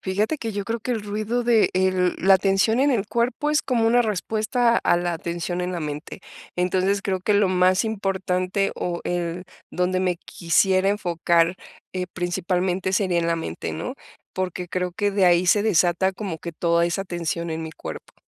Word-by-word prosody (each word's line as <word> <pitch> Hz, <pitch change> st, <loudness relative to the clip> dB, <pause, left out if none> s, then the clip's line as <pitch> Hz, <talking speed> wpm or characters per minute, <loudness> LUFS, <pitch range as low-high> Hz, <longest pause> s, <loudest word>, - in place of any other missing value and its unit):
Fíjate 210 Hz, +10 st, -1 dB
que 225 Hz, -3 st, -4 dB
yo 200 Hz, -1 st, -3 dB
creo 230 Hz, +3 st, -2 dB
que 250 Hz, +3 st, -2 dB
el 220 Hz, -, -3 dB
ruido 215 Hz, +4 st, -2 dB
de 230 Hz, -2 st, +3 dB
el 185 Hz, -1 st, +2 dB
la 195 Hz, +1 st, +5 dB
atención 195 Hz, +4 st, +2 dB
en 285 Hz, +1 st, +4 dB
el 210 Hz, -4 st, 0 dB
cuerpo 245 Hz, +5 st, 0 dB
es 300 Hz, +1 st, +2 dB
como 235 Hz, -3 st, +1 dB
una 240 Hz, +2 st, +4 dB
respuesta 225 Hz, +2 st, +1 dB
a -, -, +2 dB
la 175 Hz, 0 st, -1 dB
atención 170 Hz, +2 st, -3 dB
en 180 Hz, +1 st, -2 dB
la 175 Hz, -, -3 dB
mente, 150 Hz, +5 st, -6 dB, 0.4 s
entonces, 185 Hz, +2 st, +1 dB
creo 190 Hz, -2 st, -1 dB
que 210 Hz, +3 st, +1 dB
lo 200 Hz, -2 st, +4 dB
más 185 Hz, +2 st, +3 dB
importante, 195 Hz, -2 st, -1 dB
o 175 Hz, -1 st, -3 dB
el 175 Hz, 0 st, -2 dB, 0.3 s
donde 180 Hz, +1 st, 0 dB
me 180 Hz, -2 st, 0 dB
quisiera 185 Hz, +3 st, +1 dB
enfocar, 170 Hz, -3 st, +1 dB, 0.4 s
eh, 185 Hz, -1 st, -3 dB
principalmente 180 Hz, +1 st, -1 dB
sería 190 Hz, -3 st, +1 dB
en 170 Hz, -, 0 dB
la 170 Hz, -, +1 dB
mente, 125 Hz, -, -5 dB
¿no?, -, -, -5 dB, 0.4 s
porque 180 Hz, -1 st, -3 dB
creo 180 Hz, 0 st, -2 dB
que 205 Hz, +3 st, 0 dB
de 195 Hz, -1 st, +2 dB
ahí 175 Hz, +1 st, +4 dB
se 205 Hz, +3 st, +4 dB
desata 190 Hz, -2 st, +2 dB
como 185 Hz, -4 st, -5 dB
que 170 Hz, -, -7 dB
toda 170 Hz, +1 st, +2 dB
esa 175 Hz, +3 st, -1 dB
tensión 170 Hz, -1 st, -3 dB
en 160 Hz, 0 st, -3 dB
mi 160 Hz, -, -7 dB
cuerpo. -, -, -9 dB
185 Hz, 190 wpm, -23 LUFS, 175-205 Hz, 0.4 s, la